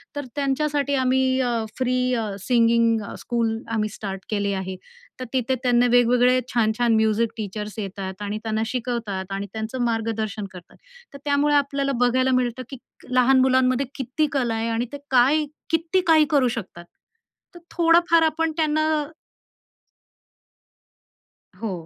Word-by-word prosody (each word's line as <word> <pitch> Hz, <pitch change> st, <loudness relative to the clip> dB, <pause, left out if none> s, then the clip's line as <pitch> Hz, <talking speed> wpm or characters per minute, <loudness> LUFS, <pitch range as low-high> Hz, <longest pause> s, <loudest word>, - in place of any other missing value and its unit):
तर 290 Hz, -1 st, -4 dB
त्यांच्यासाठी 285 Hz, 0 st, 0 dB
आम्ही 260 Hz, 0 st, +2 dB
अ, 245 Hz, -1 st, 0 dB, 0.2 s
फ्री 255 Hz, -1 st, 0 dB, 0.2 s
अ, 225 Hz, -3 st, -1 dB
सिंगिंग 230 Hz, -1 st, +3 dB, 0.2 s
स्कूल 230 Hz, -2 st, -1 dB
आम्ही 215 Hz, -1 st, 0 dB
स्टार्ट 195 Hz, -2 st, -6 dB
केले 200 Hz, -2 st, -1 dB
आहे. 190 Hz, 0 st, -4 dB, 0.4 s
तर 255 Hz, -, -4 dB
तिथे 260 Hz, 0 st, 0 dB
त्यांना 245 Hz, -1 st, +3 dB
वेगवेगळे, 245 Hz, +1 st, +4 dB
छान-छान 230 Hz, 0 st, +2 dB
म्युझिक 220 Hz, +1 st, +2 dB
टीचर्स 210 Hz, +1 st, -5 dB
येतात 195 Hz, -1 st, -6 dB
आणि 205 Hz, +1 st, -3 dB
त्यांना 220 Hz, -1 st, -1 dB
शिकवतात 225 Hz, -6 st, -4 dB
आणि 200 Hz, +1 st, -4 dB
त्यांचं 220 Hz, +3 st, -4 dB
मार्गदर्शन 225 Hz, -2 st, -2 dB
करतात. 180 Hz, -1 st, -13 dB, 0.4 s
तर -, -, -8 dB
त्यामुळे 290 Hz, +1 st, +2 dB
आपल्याला 280 Hz, -1 st, +1 dB
बघायला 255 Hz, +2 st, +2 dB
मिळतं, 250 Hz, 0 st, -1 dB
की 270 Hz, -, -8 dB, 0.4 s
लहान 255 Hz, +1 st, +4 dB
मुलांमध्ये 260 Hz, 0 st, +2 dB
किती 270 Hz, +4 st, -1 dB
कला 245 Hz, -5 st, 0 dB
आहे 225 Hz, +1 st, -2 dB
आणि 230 Hz, +1 st, -1 dB
ते 285 Hz, -, -4 dB
काय 275 Hz, +5 st, +4 dB, 0.3 s
किती 330 Hz, +3 st, +1 dB
काही 315 Hz, -2 st, +6 dB
करू 275 Hz, -4 st, +4 dB
शकतात. 175 Hz, -5 st, -8 dB, 0.7 s
तर -, -, -10 dB, 0.2 s
थोडंफार 335 Hz, 0 st, +4 dB
आपण 320 Hz, +1 st, +1 dB
त्यांना 310 Hz, -1 st, +1 dB, 2.8 s
हो, 225 Hz, -, -2 dB
245 Hz, 135 wpm, -23 LUFS, 220-275 Hz, 2.8 s, काही